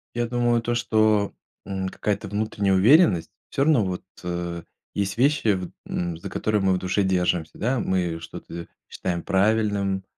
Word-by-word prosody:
Я 120 0 0
думаю, 120 -1 +1
то 120 +1 -1
что, 110 -3 +2 0.3
м, 95 -1 -3
какая-то 105 +2 -2
внутренняя 105 -1 0
уверенность. 105 - +5 0.2
Всё 140 - +1
равно, 145 -7 +4
вот, 90 -1 -3 0.2
э, 85 -1 -3 0.3
есть 100 0 -2
вещи, 135 -4 +3
вот, 90 -1 -5 0.2
м, 85 -2 -2
за 85 - -7
которые 105 -2 0
мы 95 -1 +3
в - - +1
душе 95 +2 0
держимся, 90 -3 0
да. 125 +3 0
Мы 90 -5 -1
что-то 85 +1 -8 0.2
считаем 85 -2 -3
правильным, 100 -1 +1
100 Hz, 160 wpm, -24 LUFS, 90-110 Hz, 0.3 s, уверенность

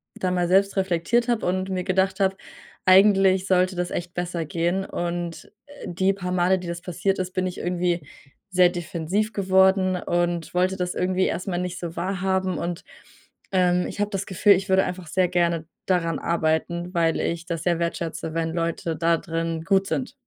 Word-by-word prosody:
da 185 - -1
mal 180 -1 +1
selbst 195 +2 +3
reflektiert 190 +6 +1
habe 235 -2 0
und 185 +1 -1
mir 185 -1 -2
gedacht 190 +1 +1
habe: 195 -1 +2 0.5
“Eigentlich 190 0 +5
sollte 185 0 +2
das 180 0 -2
echt 175 0 -4
besser 175 -2 -3
gehen“. 175 +5 -1
Und, 175 -1 -4 0.2
äh, 285 0 -11
die 190 +3 +1
paar 180 -2 -5
Male, 185 +1 +2
die 180 - -8
das 170 0 -5
passiert 190 +2 -1
ist, 185 0 -2
bin 185 -1 0
ich 180 - -6
irgendwie 175 -2 -1 0.5
sehr 180 -1 +5
defensiv 175 +4 -2
geworden 190 -1 +3
und 175 -1 -1
wollte 185 +1 +1
das 180 -1 -3
irgendwie 185 +1 +1
erstmal 175 +1 -2
nicht 180 0 -4
so 170 -1 -6
wahrhaben. 190 0 -1
Und, 170 0 -4 0.7
ähm, 180 -1 +2
ich - - -8
habe 205 0 +1
das 195 -1 -2
Gefühl, 200 +2 +4
ich 190 +1 -2
würde 190 0 +4
einfach 180 -1 -5
sehr 185 +3 +2
gerne 170 -2 0 0.2
daran 165 -4 0
arbeiten, 170 +2 -1
weil 165 -2 +1
ich 170 0 -2
das 165 -3 -4
sehr 170 -1 +1
wertschätze, 170 -1 -3
wenn 165 0 -1
Leute 165 -1 -2
da 165 +1 +2
drin 165 0 -3
gut 195 +2 +2
sind. 255 +4 -2
180 Hz, 185 wpm, -24 LUFS, 170-190 Hz, 0.7 s, Eigentlich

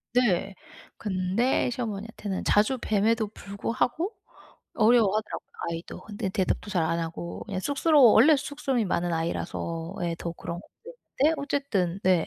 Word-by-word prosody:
네. 200 -5 +2 0.4
근데 200 +6 +1
시어머니한테는 215 -4 -4
자주 215 +6 +3
뵘에도 220 +1 +1
불구하고 235 - -2 0.6
어려워하더라고요 215 -2 +2 0.2
아이도. 165 0 -6
근데 205 -2 -4
대답도 190 +1 -1
잘 180 -5 +1
안 165 +1 0
하고 165 +1 -5
그냥 195 -3 -4
쑥스러워 285 - +5
원래 295 +8 +7
쑥스러움이 275 -4 -1
많은 175 -1 0
아이라서 165 +1 -3
예 170 -1 0
더 170 - -4
그런 170 +1 -6
건데 385 - -2
어쨌든 275 -11 -1
네 180 -3 +3
210 Hz, 335 characters per minute, -27 LUFS, 180-245 Hz, 0.6 s, 원래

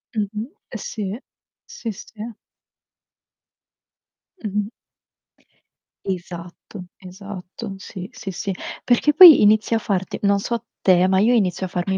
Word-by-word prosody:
Mh-mh. 215 +5 -3 0.2
Eh - - -5
sì. 215 - -5 0.5
Sì, 225 - -6
sì. 220 +2 -9 2.1
Mh-mh. 205 0 -2 1.4
Esatto, 180 +1 -7
esatto. 195 +2 -9
Sì, 185 -1 -8
sì, 200 -6 -7
sì. 195 +2 -4 0.3
Perché 260 +4 +3
poi 335 -1 +10
inizia 215 +2 +4
a - - -2
farte 190 -3 -3
non 200 0 +3
so 235 +2 -3 0.2
te, 185 -1 +4
ma 190 0 +3
io 235 +4 +4
inizio 190 -4 +1
a - - -7
farmi 185 +2 -2
200 Hz, 120 wpm, -21 LUFS, 185-220 Hz, 2.1 s, poi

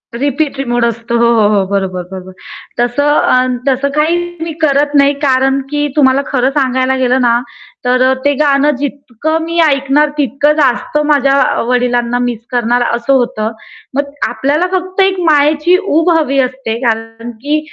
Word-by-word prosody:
Repeat 280 +2 -2
मोड 240 -1 +1
असतो. 235 +1 -3
हो, 235 0 +3 0.3
हो, 195 - +1
बरोबर, 190 -2 -2
बरोबर. 185 0 -9 0.5
तस 240 +2 0
अ, 285 -3 +3 0.2
तसं 270 +2 0
काही 315 +3 +2 0.2
मी 325 0 -3
करत 285 0 +2
नाही. 280 0 +4
कारण 270 0 +2
की 295 0 -1
तुम्हाला 270 -1 +3
खर 255 -1 +1
सांगायला 260 -1 +1
गेलं 255 0 +1
ना, 235 -1 +3 0.5
तर 250 +1 +2
अ, - - +3
ते 285 - +3
गाण 280 -1 +2
जितक 280 -2 -6
मी 335 +1 -4
ऐकणार, 280 +1 +1
तितक 280 0 0
जास्त 270 +1 0
माझ्या 280 -2 +2 0.3
वडिलांना 245 -1 0
मिस 240 -3 -4
करणार 245 0 +1
अस 235 +2 -4
होतं. 240 -4 +1 0.4
मग 285 0 -2 0.2
आपल्याला 300 +7 -1
फक्त 370 +1 -1
एक 385 -1 +1
मायेची 300 +4 +3
उब 330 +2 +1
हवी 275 -3 0
असते. 255 -3 -2
कारण 225 +1 -3
की 290 +7 -2
270 Hz, 155 wpm, -13 LUFS, 240-290 Hz, 0.5 s, नाही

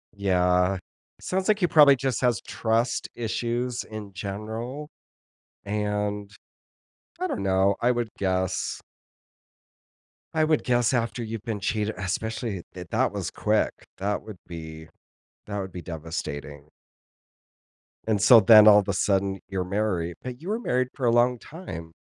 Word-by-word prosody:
Yeah, 90 -1 +2 0.4
sounds 185 +1 -2
like 215 -1 +3
he 175 - +3
probably 145 -4 +7
just 130 -1 -2
has 120 -5 +2
trust 115 +2 0
issues 120 +1 -2
in 105 -3 -9
general, 110 +9 -5 0.8
and, 105 0 -2 0.9
I 370 - 0
don't 330 - -3
know, 95 +1 +2
I 120 - +3
would 120 -2 0
guess 95 -1 -1 1.5
I 160 - +2
would 155 -1 +2
guess 120 0 +2
after 120 0 -1
you've 110 -1 -6
been 110 -4 -4
cheate 105 +2 0
especially, 110 +1 -3
th 90 -1 -8
that - - +1
was - - -3
quick, - - 0
that 100 +2 -2
would 105 -5 -10
be 80 -1 -9 0.6
that 100 -1 -4
would 95 -2 -6
be 90 - -6
devastating. 75 -3 -6 1.4
And 110 -3 +1
so, 120 +2 +9
then 110 +1 +8
all 105 -1 +8
the - - -2
sudden 95 -1 +1
you're 95 -1 -2
married, 90 -4 -1
but 125 -1 -7
you 180 - -6
were 220 +3 0
married 130 - 0
for 130 - -3
a - - +5
long 120 +1 +3
time. 85 - -9
105 Hz, 145 wpm, -26 LUFS, 95-120 Hz, 1.5 s, so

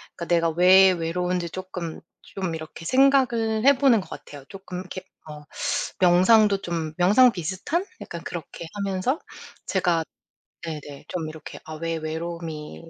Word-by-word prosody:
그러니까 170 - -6
내가 170 -1 +2
왜 185 +3 +7
외로운지 180 +1 -2
쪼끔 180 -3 -6 0.2
좀 185 -4 -5
이렇게 160 +1 -8
생각을 245 -3 +3
해 280 -1 +6
보는 260 -6 +5
것 - - -13
같아요. 145 -2 -10
쪼끔 190 -2 -8
이렇게 185 0 -8 0.3
어 150 -1 -9 0.6
명상도 195 +3 +5
좀 165 -3 -3
명상 210 +8 +6
비슷한? 190 - -3 0.2
약간 170 -1 -7
그렇게 170 0 -7
하면서 200 - -1 0.5
제가 175 -4 +1 0.6
네네 150 -3 -8
좀 165 -3 -3
이렇게 155 -1 -9
'아 155 - -8
왜 165 +1 -3
외로움이 160 0 -6
180 Hz, 300 characters per minute, -24 LUFS, 165-195 Hz, 0.6 s, 왜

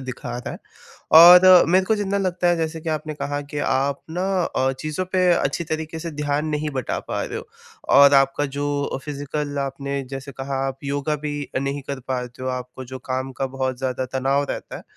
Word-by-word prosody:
दिखा 125 -2 -6
रहा 125 - -6
है। - - -8 0.6
और 180 +2 +10
मेरे 185 +2 +3
को 220 - +2
जितना 200 -1 -1
लगता 180 -2 0
है 175 - +3
जैसे 160 0 -3
कि 165 - -6
आपने 155 0 -3
कहा 145 -1 -3
कि 145 - -4
आप 140 0 0
ना 180 +3 -2 0.2
अ, 130 -3 0
चीज़ों 155 +6 -3
पे 185 -1 +3
अच्छी 170 0 0
तरीके 160 0 -4
से 165 0 -5
ध्यान 150 0 -2
नहीं 150 0 -2
बँटा 130 - -2
पा - - -2
रहे - - -5
हो - - -11 0.5
और 140 0 +8
आपका 135 +1 +3
जो 145 -1 -2
फिज़ीकल 145 0 -4
आपने 140 0 -3
जैसे 135 +1 -7
कहा 135 +2 -4
आप 135 0 -4
योगा 145 +2 -1
भी 145 -1 -4
नहीं 140 +1 -3
कर 140 -1 -4
पाते 125 -1 -4
हो, 130 - -2
आपको 125 0 -5
जो 130 +1 -8
काम 130 +1 -2
का 135 +1 -2
बहुत 130 -1 -3
ज़्यादा 130 0 -2
तनाव 135 +2 +1
रहता - - -6
है - - -10
145 Hz, 205 wpm, -22 LUFS, 135-155 Hz, 0.6 s, और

